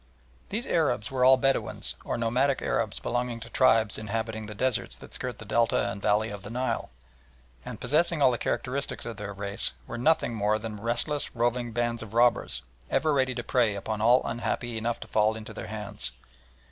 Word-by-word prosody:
These 230 +5 -3
Arabs 125 - +1
were 130 -1 +1
all 130 +1 +8
Bedouins, 135 +1 +1
or - - -2
nomadic 125 +4 +2
Arabs - - 0
belonging 120 -1 -2
to 115 +1 -9
tribes 110 -5 +3
inhabiting 110 0 -3
the 105 - -7
deserts 130 +2 0
that - - -13
skirt 125 -3 -4
the 110 - -10
Delta 115 +3 +2
and 100 - -7
valley 105 +2 +2
of 100 -1 -7
the 105 - -9
Nile, 125 +3 -2 0.7
and, - - -7
possessing 170 +2 +2
all 135 -3 +6
the 120 - -2
characteristics 140 +3 -2
of 115 -2 -6
their 105 -1 -5
race, 100 0 0
were 120 - -6
nothing 150 -2 +2
more 105 0 +1
than 110 0 -6
restless, 120 +8 -1
roving 120 0 0
bands 120 0 -1
of 110 -1 -9
robbers, 120 0 +3 0.3
ever 150 +3 +2
ready 130 -2 +1
to 120 - -3
prey 115 -5 +2
upon 105 +2 -3
all 120 +3 +5
unhappy 120 0 -2
enough 115 +1 -2
to - - -7
fall 110 0 +2
into 110 0 -8
their - - -7
hands. 105 -2 -3
115 Hz, 190 wpm, -28 LUFS, 110-125 Hz, 0.7 s, all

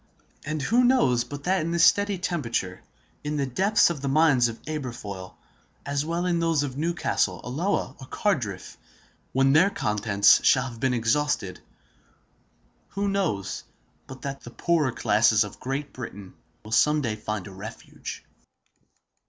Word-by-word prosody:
And 155 -1 -3
who 235 - +3
knows 190 - +3
but 145 +2 -8
that 185 +1 +1
in 160 - -2
this 170 0 +4
steady 200 -1 +3
temperature, 120 - -2 0.4
in 150 0 -2
the 140 - 0
depths 190 - +3
of 150 -5 -6
the 140 - -3
mines 135 -4 +4
of 115 -1 -7
Aberfoyle, 120 -11 -6 0.5
as 140 0 -1
well 170 +3 -2
as 180 - +1
in 170 - +1
those 165 -3 +1
of 135 -3 -4
Newcastle, 165 +4 0
Alloa, 145 +2 -1
or 130 - -10
Cardiff—when 135 - -2
their 175 +6 +5
contents 105 - +3
shall 130 -1 +4
have 120 -4 -7
been 130 0 +1
exhausted—who 115 - -4
knows 165 - -2 0.4
but 130 0 -11
that 140 0 -5
the - - -10
poorer 155 +1 +1
classes 110 -1 +3
of 105 0 -9
Great 135 +2 -4
Britain 100 -6 -8 0.3
will 110 - -10
some 150 +6 +3
day 115 -5 -2
find 105 -2 -4
a 100 - -9
refuge? 100 +4 -9
135 Hz, 150 wpm, -25 LUFS, 115-165 Hz, 0.5 s, their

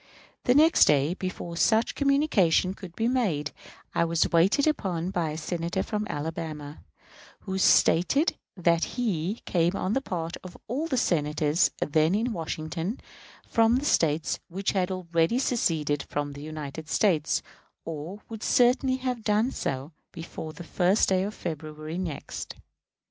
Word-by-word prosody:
The 245 - +4
next 320 +3 +6
day, 145 +3 +3
before 185 -2 -5
such 220 +5 +3
communication 275 - +2
could 185 -4 -11
be 225 - 0
made, 185 - 0 0.4
I - - +2
was 165 -1 +1
waited 190 - +4
upon 185 - -1
by 175 -4 -1
a 150 - -5
Senator 170 +3 -2
from 210 -1 -3
Alabama, 150 -1 -5 0.6
who 190 -1 -3
stated 190 - +4 0.2
that 170 -1 +2
he 205 -3 -1
came 175 +1 +1
on 195 +1 -1
the 270 - +1
part 170 -8 -4
of 185 - -10
all 280 +8 -2
the 265 - -1
Senators 150 -3 +2
then 155 +4 +2
in 230 +3 0
Washington 165 - -4 0.5
from 230 +1 +3
the 270 +3 -1
States 160 - +1
which 190 +3 -2
had 185 -2 0
already 175 +2 0
seceded 160 - 0
from 145 0 -3
the 140 - -9
United 155 0 -7
States, 165 -7 +2 0.4
or 165 +6 -6
would 220 -2 -8
certainly 255 +1 +3
have 255 -3 -3
done 215 +4 +2
so 135 +3 -3 0.2
before 165 -2 -7
the 175 - -10
1st 180 +4 +2
day 185 -1 +3
of 205 +3 -3
February 155 0 -5
next. 170 -6 -5
175 Hz, 150 wpm, -27 LUFS, 160-220 Hz, 0.6 s, next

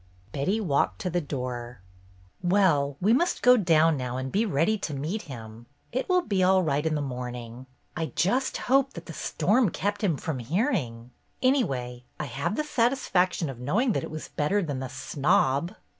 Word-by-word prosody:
Betty 185 - 0
walked 140 - +1
to 180 - -2
the 175 +1 0
door. 125 -4 -5 0.6
"Well, 170 -7 +2
we 210 +5 +3
must 345 +8 +1
go 250 0 +8
down 165 -7 +4
now 125 -1 -3
and 130 0 -4
be 220 +3 +1
ready 165 +6 +2
to 155 -7 -4
meet 160 +10 -3
him. 115 -2 -9 0.2
It 260 +8 -2
will 365 -1 +3
be 195 - 0
all 185 0 +4
right 145 -2 0
in 160 -1 0
the 145 - -1
morn 125 -2 -4
ing! 120 +2 -9 0.3
I 165 -2 -2
just 200 +11 +1
hope 270 +1 +2
that - - -9
the - - -8
storm 225 0 +1
kept 205 +4 -2
him 170 -8 +2
from 145 -3 -4
hearing. 125 - -1 0.3
Anyway, 130 - 0
I 150 - -2
have 140 - -2
the 305 - 0
satisfaction 230 - +1
of 135 -4 -7
knowing 205 - +1
that - - -1
it - - -5
was 155 0 -7
better 190 +7 0
than 145 -5 -3
the 130 -1 -5
'snob. 155 +4 +1
160 Hz, 190 wpm, -27 LUFS, 130-205 Hz, 0.6 s, go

